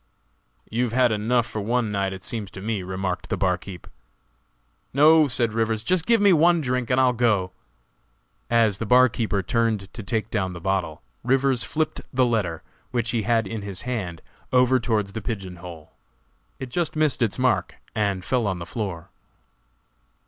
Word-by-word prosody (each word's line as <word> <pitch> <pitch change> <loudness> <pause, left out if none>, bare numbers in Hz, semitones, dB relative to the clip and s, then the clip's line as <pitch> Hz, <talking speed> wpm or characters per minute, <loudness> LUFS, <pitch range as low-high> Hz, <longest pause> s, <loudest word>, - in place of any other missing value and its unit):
"You 120 +3 0
have 115 - -5
had 125 -1 +3
enough 115 +3 +1
for 110 -2 -5
one 115 +1 0
night, 100 -1 -1
it 95 -1 -8
seems 110 -6 -4
to 95 - -10
me," 105 0 -2
remarked 95 0 -4
the - - -1
barkeeper. 90 -1 -3 1.0
"No," 155 +2 +6
said 120 -4 +1
Rivers, 110 -1 0
"just 180 +5 +1
give 230 -1 +4
me 200 -2 +5
one 170 +2 +4
drink 125 -4 -1
and 125 - +3
I'll 130 -1 +4
go!" 105 -6 +1 1.0
As 110 -4 +3
the 115 - -3
barkeeper 115 -4 +3
turned 110 -2 -1
to 115 - -7
take 110 +1 -2
down 95 -4 -1
the 85 - -7
bottle, 85 -5 -2 0.2
Rivers 135 -1 +2
flipped 155 +1 -2
the 130 0 +3
letter, 105 -9 -1 0.3
which 120 -2 -1
he 115 - 0
had 115 +1 +1
in 110 +2 -5
his 100 -2 -4
hand, 100 -10 -4 0.3
over 125 0 +4
towards 105 -4 -1
the 110 - -4
pigeon 95 -5 -5
hole; 85 -3 -11 0.7
it 130 - -7
just 165 +5 -2
missed 155 -4 +1
its 110 -5 +1
mark - - +1 0.2
and 100 -3 -1
fell 125 -4 0
on 95 -2 -1
the 85 - -6
floor. 95 -4 -5
115 Hz, 175 wpm, -24 LUFS, 95-125 Hz, 1.0 s, No